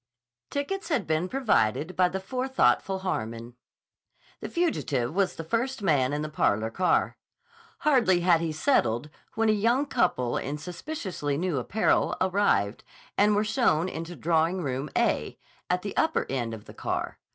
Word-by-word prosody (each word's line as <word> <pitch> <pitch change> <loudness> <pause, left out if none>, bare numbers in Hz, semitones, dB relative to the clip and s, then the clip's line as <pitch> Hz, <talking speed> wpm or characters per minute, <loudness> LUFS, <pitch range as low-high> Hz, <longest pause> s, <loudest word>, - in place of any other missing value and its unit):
Tickets 335 +6 -3
had 290 -7 +1
been 160 +3 0
provided 185 - +1
by 180 -1 +4
the 190 - -3
forethoughtful 255 -3 +1
Harmon. 115 -9 -4 0.9
The - - -6
fugitive 155 - 0
was 195 0 +1
the 165 - -6
first 235 +6 -2
man 140 -7 +2
in 150 +1 -2
the - - -3
parlor 110 -7 0
car. 180 +9 +1 0.6
Hardly 240 -12 +3
had 170 -2 +4
he 165 -1 -1
settled 150 - +1 0.2
when 225 0 +2
a - - +5
young 230 +7 +2
couple 125 - 0
in 145 +2 -3
suspiciously 175 - -4
new 170 -4 -1
apparel 210 - +1
arrived, 185 - +1 0.3
and 205 +1 +4
were 205 - +2
shown 215 - +2
into 170 -1 -6
Drawing 165 +3 +1
Room 135 +1 -3
"A," - - 0 0.3
at 180 0 0
the 205 - -5
upper 320 - +1
end 120 -4 -2
of 105 - -13
the - - -12
car. - - -3
180 Hz, 155 wpm, -27 LUFS, 145-220 Hz, 0.9 s, a